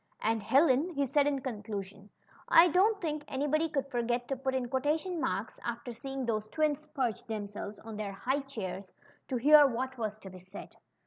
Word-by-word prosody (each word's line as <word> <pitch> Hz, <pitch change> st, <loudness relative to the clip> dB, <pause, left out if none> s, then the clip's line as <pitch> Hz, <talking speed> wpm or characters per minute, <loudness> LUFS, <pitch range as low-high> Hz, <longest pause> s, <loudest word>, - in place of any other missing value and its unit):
^^Andj 225 Hz, 0 st, +1 dB
Helen/' 280 Hz, -, +3 dB
he 280 Hz, 0 st, +1 dB
said 285 Hz, +2 st, +2 dB
in 280 Hz, -2 st, 0 dB
conclusion, 205 Hz, -4 st, -6 dB, 0.6 s
don't 400 Hz, +5 st, +3 dB
think 305 Hz, -4 st, -3 dB
anybody 295 Hz, +4 st, 0 dB
'could 280 Hz, -3 st, -1 dB
forget 240 Hz, 0 st, -1 dB
to 270 Hz, -, 0 dB
put 265 Hz, 0 st, -2 dB
in 255 Hz, -2 st, -1 dB
quotation 305 Hz, +7 st, -1 dB
marks 195 Hz, +1 st, -2 dB
after 235 Hz, +1 st, -4 dB
seeing 270 Hz, +2 st, -5 dB
those 215 Hz, -2 st, -1 dB
twins 305 Hz, +4 st, 0 dB
perch 260 Hz, -, -2 dB
themselves 205 Hz, -1 st, -5 dB
on 220 Hz, 0 st, -9 dB
their 205 Hz, -2 st, -4 dB
high 260 Hz, +8 st, -1 dB
chairs 200 Hz, -9 st, -6 dB, 0.4 s
to 255 Hz, -, -1 dB
hear 295 Hz, +3 st, +8 dB
what 260 Hz, +1 st, -3 dB
was 215 Hz, -1 st, -2 dB
to 195 Hz, -3 st, -11 dB
be 185 Hz, -, -11 dB
said. 185 Hz, +3 st, -11 dB
255 Hz, 180 wpm, -31 LUFS, 215-290 Hz, 0.6 s, hear